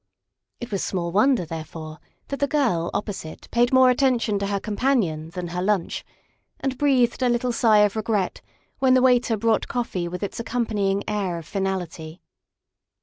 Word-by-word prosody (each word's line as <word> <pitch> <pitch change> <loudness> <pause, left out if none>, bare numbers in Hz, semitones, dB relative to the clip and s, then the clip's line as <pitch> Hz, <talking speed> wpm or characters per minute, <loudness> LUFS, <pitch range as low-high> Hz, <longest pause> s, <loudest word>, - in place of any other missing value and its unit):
It 240 -2 -7
was 195 - -1
small 170 -3 -2
wonder, 215 +1 +3
there 160 0 -5
fore, 155 0 -9 0.3
that 280 - -4
the 285 - +2
girl 240 - +1
opposite 190 -7 -5
paid 240 +1 +3
more 260 -1 +6
attention 245 -5 +1
to 200 - -2
her 200 0 -1
companion 205 - 0
than 175 0 -5
her 180 +1 -3
lunch, 195 -2 0 0.6
and 270 -1 -2
breathed 260 -3 +2
a 250 - +3
little 240 +1 +1
sigh 215 -3 +5
of 205 - -2
regret 215 -3 -1 0.4
when 260 -1 +4
the 255 - +4
waiter 245 -3 +3
brought 225 +1 +1
coffee 195 -8 -2
with 180 +3 -5
its 200 - -4
accom 235 +1 -1
panying 200 -2 0
air 195 -5 -1
of 165 - -8
finality. 180 -4 -4
210 Hz, 175 wpm, -24 LUFS, 180-245 Hz, 0.6 s, more